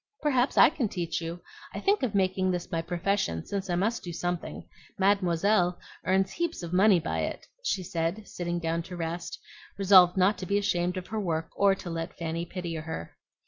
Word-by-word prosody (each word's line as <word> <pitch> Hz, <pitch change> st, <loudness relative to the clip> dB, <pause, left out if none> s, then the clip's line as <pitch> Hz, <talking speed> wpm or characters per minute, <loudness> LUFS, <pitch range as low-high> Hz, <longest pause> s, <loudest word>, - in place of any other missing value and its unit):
"Perhaps 260 Hz, -3 st, +2 dB
I -, -, +8 dB
can 265 Hz, -9 st, -1 dB
teach 175 Hz, -2 st, -3 dB
you. 170 Hz, +1 st, -6 dB, 0.3 s
I -, -, -2 dB
think 400 Hz, +1 st, +2 dB
of 235 Hz, -6 st, -1 dB
making 185 Hz, -1 st, +2 dB
this 180 Hz, -1 st, -3 dB
my 165 Hz, -, 0 dB
profession 170 Hz, -, -1 dB
since 195 Hz, -1 st, -4 dB
I 175 Hz, -, +1 dB
must 215 Hz, +6 st, 0 dB
do 175 Hz, -, -6 dB
something. 175 Hz, +1 st, -4 dB, 0.3 s
Mademoiselle 190 Hz, -1 st, +2 dB, 0.3 s
earns 190 Hz, +2 st, +2 dB
heaps 340 Hz, -, -3 dB
of 170 Hz, 0 st, -5 dB
money 190 Hz, 0 st, +5 dB
by 165 Hz, -, -2 dB
it," -, -, -3 dB, 0.2 s
she 200 Hz, -, -1 dB
said, 170 Hz, +5 st, -2 dB
sitting 175 Hz, -1 st, -3 dB
down 165 Hz, 0 st, -1 dB
to 180 Hz, -, -6 dB
rest, 170 Hz, +1 st, -4 dB, 0.4 s
resolved 190 Hz, -2 st, +6 dB
not 190 Hz, +3 st, +3 dB
to 185 Hz, -, -5 dB
be 200 Hz, -, +2 dB
ashamed 180 Hz, -2 st, 0 dB
of 185 Hz, -, -6 dB
her 220 Hz, -, -2 dB
work 165 Hz, -5 st, -2 dB
or 200 Hz, -1 st, +4 dB
to 180 Hz, -2 st, -7 dB
let 165 Hz, 0 st, -5 dB
Fanny 165 Hz, 0 st, -3 dB
pity 175 Hz, -2 st, -5 dB
her. 160 Hz, -, -6 dB
180 Hz, 195 wpm, -28 LUFS, 170-200 Hz, 0.4 s, I